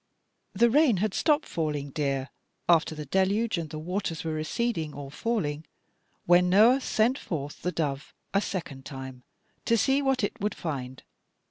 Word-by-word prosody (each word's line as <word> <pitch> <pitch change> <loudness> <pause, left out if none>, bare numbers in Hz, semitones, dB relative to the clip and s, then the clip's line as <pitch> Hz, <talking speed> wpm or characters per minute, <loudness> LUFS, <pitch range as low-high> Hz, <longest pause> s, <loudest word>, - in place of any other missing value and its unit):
"The 230 +4 +4
rain 280 -5 +4
had 205 +1 0
stopped 300 -1 +2
falling, 150 -3 -3
dear, 135 -2 -2 0.4
after 165 -1 +3
the 150 -1 -6
deluge, 195 - +1
and 160 -2 -5
the 155 - -6
waters 170 +1 -3
were 160 -1 -2
receding, 160 0 -2
or 140 -1 -7
falling, 155 -7 -2 0.6
when 175 +1 +5
Noah 225 +8 +6
sent 245 +2 +1
forth 145 -4 -5
the 180 - -1
dove 145 -4 -3 0.2
a 195 - +3
second 150 -10 -5
time 130 -2 -8 0.4
to 230 - +3
see 270 +5 +3
what 270 -4 +1
it 200 - -2
would 210 +1 -1
find. 130 -5 -5
170 Hz, 160 wpm, -27 LUFS, 145-220 Hz, 0.6 s, Noah